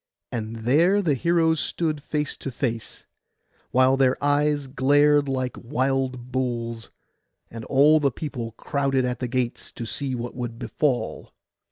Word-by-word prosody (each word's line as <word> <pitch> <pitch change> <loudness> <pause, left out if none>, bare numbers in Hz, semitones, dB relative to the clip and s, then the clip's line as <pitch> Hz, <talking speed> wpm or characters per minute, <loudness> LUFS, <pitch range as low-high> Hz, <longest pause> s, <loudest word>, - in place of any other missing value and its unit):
And 115 -1 -4
there 170 +11 +4
the 155 -5 +2
heroes 160 +3 +2
stood 155 -2 -1
face 150 0 -2
to - - -5
face, 120 -3 -4 0.6
while 130 +1 +4
their 130 -1 +3
eyes 145 0 +1
glared 145 +2 +3
like 130 -1 -2
wild 130 0 -1
bulls'; 120 -3 -3 0.6
and 115 -1 -7
all 150 +3 +5
the 140 -2 +2
people 125 -4 -5
crowded 135 +1 0
at 125 -1 -2
the 125 - -2
gates 125 -1 -2
to 115 - -6
see 130 +3 -2
what 120 0 -5
would 120 -2 -5
befall. 125 - -2
130 Hz, 145 wpm, -24 LUFS, 120-145 Hz, 0.6 s, all